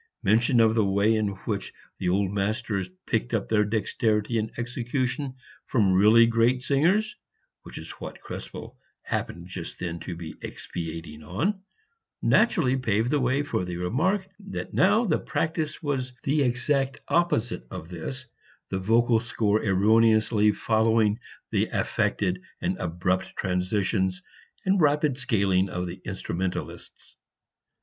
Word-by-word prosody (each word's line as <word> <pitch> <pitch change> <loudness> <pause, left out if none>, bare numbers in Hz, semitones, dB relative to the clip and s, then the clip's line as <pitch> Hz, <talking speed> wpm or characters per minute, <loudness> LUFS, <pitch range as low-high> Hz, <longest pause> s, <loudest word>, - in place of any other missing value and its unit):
Mention 115 +4 +4
of 110 -1 +5
the 110 -1 +3
way 100 +3 +3
in 110 -1 +1 0.2
which - - -3 0.3
the 90 - 0
old 95 +1 +1
masters 100 -1 -1 0.2
picked - - 0
up - - -1
their 105 - +3
dexterity 110 +1 0
in 110 +1 -2
execution 125 +3 -2 0.3
from 100 -6 +3
really 105 +5 +7
great 115 +2 +2
singers 185 +11 +2 0.5
(which - - -11
was - - -7
what - - -7
Krespel - - -8 0.3
happened 85 0 -3
just 90 -2 -7
then 85 -1 -4
to 85 +2 -6
be 85 -1 -7
expatiating 80 -2 -6
upon) 160 - -1 0.6
naturally 170 - +3
paved 115 -1 0
the 150 - +2
way 130 +2 +1
for 140 -10 -1
the 90 -1 -4
remark 165 - 0
that 195 -1 -6
now 210 +5 +4
the 170 - +1
practice 160 0 -2
was 130 -3 -2
the 145 +2 +2
exact 135 +2 +1
opposite 120 - +1
of 80 - -8
this, 110 +10 -5 0.5
the 95 - -1
vocal 115 +4 +3
score 110 -2 0
erroneously 110 +1 +4
following 110 0 +2 0.3
the - - +2
affected 95 -2 0 0.2
and 180 +2 -1
abrupt 90 +2 -1
transitions 95 0 0 0.4
and 190 -1 +3
rapid 150 -2 +2
scaling 100 -6 +2
of 90 0 -3
the 90 +1 -7
instrumentalists. 95 -1 -5
110 Hz, 135 wpm, -26 LUFS, 95-130 Hz, 0.6 s, really